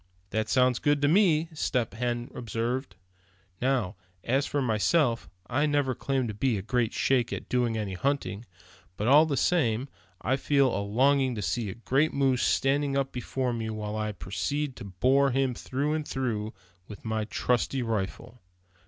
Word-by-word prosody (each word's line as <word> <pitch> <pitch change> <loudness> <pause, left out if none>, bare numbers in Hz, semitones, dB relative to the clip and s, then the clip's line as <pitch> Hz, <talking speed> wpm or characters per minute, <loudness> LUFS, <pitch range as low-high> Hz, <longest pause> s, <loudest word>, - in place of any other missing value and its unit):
"That 110 +1 -1
sounds 125 -2 +3
good 145 0 +2
to - - +5
me," 165 -2 +4
Step 125 -8 -1
Hen 120 +1 -2
observed. 120 +3 -3 0.7
"Now, 125 -8 0 0.3
as 135 +4 +1
for 145 - -1
myself, 120 +2 +1 0.2
I 145 +7 +1
never 145 -3 +1
claimed 135 -1 -1
to - - -4
be 110 0 0
great 115 +1 0
shakes 125 -3 +1
at - - -6
doing 120 -3 0
any 105 -3 -3
hunting; 120 -1 -2 0.5
but 105 - -1
all 150 +5 +7
the 140 -3 -1
same, 135 -7 +1 0.3
I 130 +5 0
feel 140 -2 +2
a 100 - -1
longing 130 +5 +2
to 105 - -4
see 100 +5 -1
a 95 - -6
great 135 +6 +1
moose 135 -3 +2
standing 140 +1 +1
up 135 -1 0
before 125 0 -2
me 110 -1 -3
while 105 -1 -4
I 110 0 -2
proceed 135 +8 -3
to 115 - -8
bore 130 +9 +3
him 135 0 +1
through 140 +5 -2
and 155 -1 -2
through 110 -5 -2 0.4
with 105 0 -11
my 110 -1 -1
trusty 125 +3 0
rifle." 115 +2 -4
125 Hz, 170 wpm, -28 LUFS, 110-140 Hz, 0.7 s, all